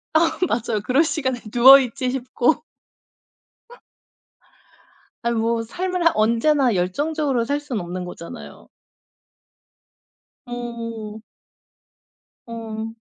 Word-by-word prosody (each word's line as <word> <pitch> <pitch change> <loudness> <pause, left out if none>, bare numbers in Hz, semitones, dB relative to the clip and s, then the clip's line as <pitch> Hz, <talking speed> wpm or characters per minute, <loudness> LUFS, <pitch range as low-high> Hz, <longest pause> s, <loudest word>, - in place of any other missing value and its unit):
아 325 0 +3
맞아요. 225 -2 -1
그럴 270 +6 +3
시간에 260 -6 -2
누워 265 +3 +9
있지 255 0 -2
싶고 260 +2 0 2.6
아이 235 - +2
뭐 230 0 0
삶을 360 +6 -3
한 330 - +6
언제나 235 +3 +2
열정적으로 275 - 0
살 285 +2 -1
수는 250 -9 -4
없는 180 +1 -5
거잖아요. 175 -1 -10 1.8
음. 230 -3 -6 1.3
어. 225 -1 -6
240 Hz, 185 characters per minute, -22 LUFS, 225-285 Hz, 2.6 s, 누워